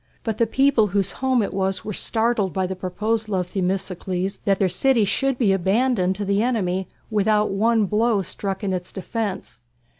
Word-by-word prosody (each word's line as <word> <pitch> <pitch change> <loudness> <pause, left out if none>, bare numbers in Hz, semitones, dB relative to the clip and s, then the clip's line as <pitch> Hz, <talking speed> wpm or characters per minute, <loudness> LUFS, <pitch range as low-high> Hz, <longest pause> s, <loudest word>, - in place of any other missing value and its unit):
But 220 -2 -3
the 230 - +3
people 265 -2 +3
whose 195 0 0
home 260 -3 +1
it 200 - -4
was 190 0 -1
were 210 - -3
startled 220 -3 0
by 190 -1 0
the 190 +1 -4
proposal 210 +4 -2
of 180 -1 -2
Themistocles 185 0 -2
that 195 -1 +3
their 190 - +2
city 230 +5 +2
should 270 +5 0
be 225 -6 +3
abandoned 195 0 +1
to 205 +1 -3
the 200 +1 +1
enemy 190 -6 0 0.2
without 210 0 +2
one 220 +2 +2
blow 215 0 +1
struck 195 +2 -5
in 195 -2 -1
its 180 -1 -4
defence. 195 - -4
200 Hz, 180 wpm, -23 LUFS, 190-225 Hz, 0.2 s, the